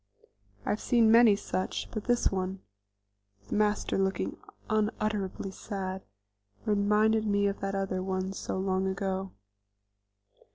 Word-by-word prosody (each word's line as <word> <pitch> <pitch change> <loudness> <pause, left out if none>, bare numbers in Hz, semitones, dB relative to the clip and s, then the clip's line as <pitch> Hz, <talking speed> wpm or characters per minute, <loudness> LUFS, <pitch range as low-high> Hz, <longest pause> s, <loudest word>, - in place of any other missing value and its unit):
I - - +1
have 210 - -1
seen 230 -3 +4
many 230 -2 +7
such, 190 -2 -3
but 215 -3 -4
this 245 -1 +2
one 190 0 -2 0.8
with 100 0 -23
Master 210 -1 +1
looking 195 0 0 0.3
unutterably 210 -3 -1
sad 190 -1 -5 0.6
reminded 215 +1 +3
me 200 0 +2
of 200 0 0
that 195 0 -2
other 190 -1 -1
one 190 0 -2
so 190 - -4
long 190 0 0
ago. 190 0 -2
195 Hz, 125 wpm, -29 LUFS, 190-215 Hz, 0.8 s, many